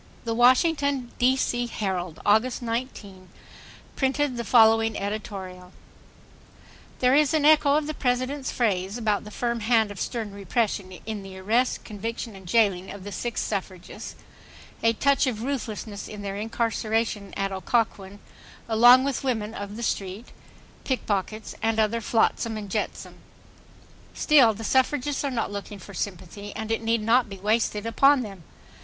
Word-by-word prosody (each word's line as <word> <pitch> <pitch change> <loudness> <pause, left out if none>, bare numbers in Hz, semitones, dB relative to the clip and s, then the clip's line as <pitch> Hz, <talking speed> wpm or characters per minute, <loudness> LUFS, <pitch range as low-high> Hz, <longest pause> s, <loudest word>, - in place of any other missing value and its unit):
The 230 - -2
Washington 260 +1 +3
(D. 255 +2 +4
C.) 245 -2 0
Herald, 185 -7 -3
August 220 +5 +2
19, 225 -6 -5 0.7
printed 270 0 0
the 235 - -3
following 225 -1 +4
editorial: 190 -3 -6 1.3
There 250 0 +4
is 300 +2 +4
an 300 -2 +2
echo 295 -2 +5
of 305 0 +1
the 310 - -3
President's 260 +1 -1
phrase 200 -3 0
about 215 -4 0
the - - -8
"firm 235 +2 -2
hand 220 -1 +2
of 200 - -9
stern 225 -5 -3
repression" 200 -1 -1
in 215 -1 -4
the 195 -1 -10
arrest, 225 +7 0
conviction 225 +1 -5
and 190 -2 -12
jailing 195 -3 +2
of 200 -2 -8
the 205 - -7
six 235 +5 -3
suffragists; 185 -3 -5 0.7
a 230 0 +3
touch 280 +4 +2
of 225 -3 -2
ruthlessness 220 -6 -4
in 210 -1 -8
their 195 -1 -4
incarceration 225 -1 -1
at 195 0 -1
Occoquan 200 0 -1 0.5
along 240 +3 +7
with 275 -1 -2
women 220 -5 -1
of 205 -2 -6
the 235 - -6
street, 200 +1 -3 0.5
pickpockets 215 -4 -2
and 225 0 +1
other 220 +2 +1
flotsam 225 0 +1
and 205 -2 -7
jetsam. - - -4 1.0
Still, 260 -8 +5
the 225 - -8
suffragists 265 +4 +1
are 280 - 0
not 235 -5 -2
looking 205 0 -6
for 200 +1 -12
sympathy, 195 +2 -6
and 220 0 -4
it 225 - 0
need 225 -1 0
not 230 +1 +3
be 195 - -8
wasted 210 +1 0
upon 275 +4 +4
them. 195 -5 -9
225 Hz, 150 wpm, -25 LUFS, 200-245 Hz, 1.3 s, along